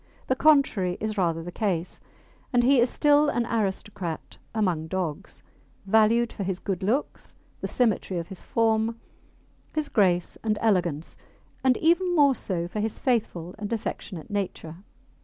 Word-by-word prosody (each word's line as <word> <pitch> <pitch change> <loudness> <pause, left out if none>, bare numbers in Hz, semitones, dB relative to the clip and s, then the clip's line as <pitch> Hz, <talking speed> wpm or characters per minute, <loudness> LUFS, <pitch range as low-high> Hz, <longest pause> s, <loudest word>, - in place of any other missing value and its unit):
The 260 - +1
contrary 260 -12 +3
is 215 0 -2
rather 165 -4 0
the 175 - -7
case, 180 -4 -2 0.5
and 245 -2 +3
he 265 +1 +5
is 240 +1 +4
still 295 +1 +4
an 240 -3 0
aristocrat 195 -6 -3
among 180 -8 0
dogs, 170 -4 -4 0.4
valued 220 +3 +3
for - - -7
his 190 -1 -1
good 195 0 -3
looks, 230 +10 -2 0.2
the - - -3
symmetry 220 -6 0
of 170 +1 -4
his 190 - -8
form, 225 0 +1 0.8
his 305 -2 -1
grace 180 -4 +1
and 215 -1 0
elegance, 175 -8 0 0.5
and 260 -2 +4
even 350 +2 +2
more 285 -3 +5
so 180 -7 -2
for 210 - -5
his 215 +1 -2
faithful 205 - -1
and 205 +1 -5
affectionate 205 -5 -5
nature. 180 -5 -4
210 Hz, 150 wpm, -26 LUFS, 180-240 Hz, 0.8 s, he